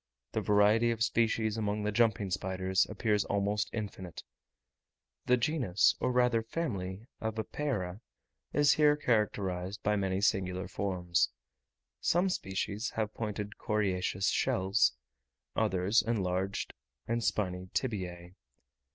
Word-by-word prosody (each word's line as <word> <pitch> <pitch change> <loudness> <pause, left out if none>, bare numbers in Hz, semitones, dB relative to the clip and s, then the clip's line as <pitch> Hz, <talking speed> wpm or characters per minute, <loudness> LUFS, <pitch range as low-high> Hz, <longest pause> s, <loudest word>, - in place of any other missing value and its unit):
The - - -1
variety 105 +3 +4
of 115 -1 0
species 110 -1 +1
among 105 -1 -1
the 105 - 0
jumping 105 -3 +2
spiders 95 0 0
appears 105 -3 +1
almost 100 +1 0
infinite. 100 -5 -6 1.0
The 125 - +5
genus, 120 - +2
or 125 - +1
rather 125 -2 +3
family, 110 - -4
of 110 0 -3
Epeira, 110 -5 -3 0.5
is 145 0 +4
here 150 -1 +5
characterized 100 -6 -1
by 105 +1 +2
many 95 -1 0
singular 95 -3 0
forms; 90 -3 0 0.7
some 180 +3 +2
species 100 - -2
have 110 -1 -1
pointed 105 -2 -4
coriaceous 95 -2 0
shells, 95 +3 +2 0.6
others 100 0 +2
enlarged 95 -3 -1 0.3
and 115 0 0
spiny 90 -4 -1
tibiae. 90 -7 -3
105 Hz, 115 wpm, -31 LUFS, 95-115 Hz, 1.0 s, The